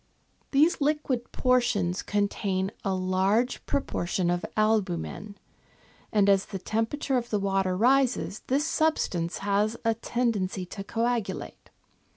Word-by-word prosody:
These 300 +4 +3
liquid 280 -4 0
portions 240 -8 +1
contain 200 -2 -1
a 195 - 0
large 190 +6 +1
pro 280 - +1
portion 175 -4 -1
of 175 0 -1
albumen, 205 -1 0 0.7
and 205 -2 +3
as 195 -1 +4
the 195 - -5
temperature 225 +7 -1
of 240 -1 -3
the 210 - +1
water 195 -2 0
rises 250 -2 +2
this 280 +4 +1
substance 250 - 0
has 205 +3 +1
a 225 - +4
tendency 220 -5 -1
to 195 +2 -7
coagulate. 230 +1 -3
210 Hz, 125 wpm, -27 LUFS, 190-245 Hz, 0.7 s, as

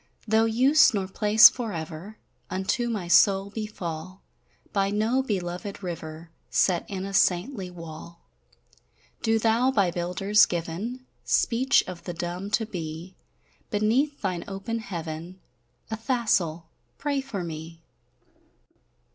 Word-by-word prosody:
Tho' 220 +1 +4
use 260 +3 +5
nor 195 -2 -1
place 210 +2 +7
forever 190 -3 -5 0.3
Unto 195 +6 -1
my 205 -6 -3
soul 195 +3 +4
befall, 185 -4 -6 0.5
By 195 -1 +2
no 220 +6 +1
belovèd 195 -3 -4
river 165 -2 -7 0.2
Set 180 -3 +1
in 190 -2 -4
a 195 - -6
saintly 190 +2 +1
wall, 170 -1 -10 1.0
Do 225 -1 +2
thou 230 +3 +2
by 200 -9 +2
builders 180 +5 +3
given 185 +10 -4 0.2
Speech 250 +3 +3
of 175 -2 -9
the 175 - -5
dumb 175 +3 -4
to 225 +2 +1
be, 170 -2 -7 0.5
Beneath 240 +8 +1
thine 180 -3 -1
open 200 +4 -4
heaven, 170 -3 -6 0.5
Athassel! 220 - 0 0.3
pray 285 -1 -1
for 225 -9 -5
me. 165 0 -8
195 Hz, 115 wpm, -26 LUFS, 175-225 Hz, 1.0 s, place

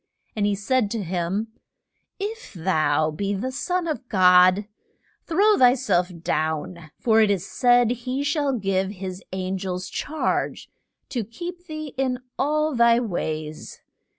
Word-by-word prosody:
And 205 -1 +1
he 205 - +1
said 215 +2 +1
to 220 -1 -3
him, 185 +5 -2 0.7
If 445 +4 -5
thou 155 -3 +1
be 200 +6 -2
the 250 +7 -3
Son 355 +6 -2
of 290 -6 -4
God, 185 0 +5 0.6
throw 405 +6 +4
thy 250 0 +6
self 190 -9 +1
down; 155 +1 -2
for 225 -2 +4
it 215 - +4
is 195 -2 0
said, 245 0 +3
he 250 +3 -3
shall 285 -1 0
give 195 -2 0
his 185 -1 -6
an 190 0 -3
gels 185 -1 -4
charge 310 +1 -2 0.4
to 245 -4 -2
keep 350 - -8
thee 310 -2 -6
in 260 -2 +1 0.2
all 305 +2 +1
thy 235 -1 +5
ways. 155 -8 -4
215 Hz, 145 wpm, -24 LUFS, 185-270 Hz, 0.7 s, thy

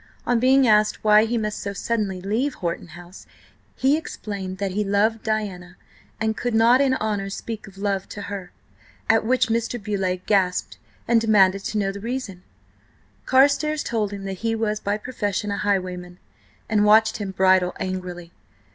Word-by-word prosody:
On 245 -1 +2
being 260 +1 +4
asked 215 -1 +3
why 215 0 +6
he 235 +1 -1
must 210 -1 -2
so 200 - -4
suddenly 205 -3 -2
leave 225 +9 -1
Horton 170 0 -4
House, 175 +2 -13 0.5
he 270 +3 +3
explained 200 -11 -5
that 195 -1 -2
he 210 +3 -1
loved 210 +3 +1
Diana 195 -5 -3 0.4
and 220 0 0
could 240 +2 -2
not 235 +4 +5
in 265 -2 +3
honour 205 -4 -2
speak 220 +1 -6
of 195 0 -15
love 195 -1 -2
to 205 - -7
her. 195 -3 -6 0.6
At 225 0 +3
which 250 +1 +2
Mr. 230 +1 -1
Beauleigh 195 -3 -2
gasped 190 -3 0 0.3
and 230 -1 +4
demanded 195 -3 +4
to 215 - -2
know 195 -2 0
the 200 - -8
reason. 225 -5 -5 0.9
Carstares 290 +3 +3
told 215 -3 -1
him 200 -1 -7
that 195 -1 -5
he 225 0 -1
was 215 -1 -1
by 205 0 -1
profession 210 -3 -3
a 200 - -2
highwayman, 180 -3 -2 0.5
and 210 -1 +2
watched 220 +1 +5
him 205 -2 -4
bridle 185 -1 +3
angrily. 180 -2 -5
210 Hz, 170 wpm, -23 LUFS, 190-225 Hz, 0.9 s, why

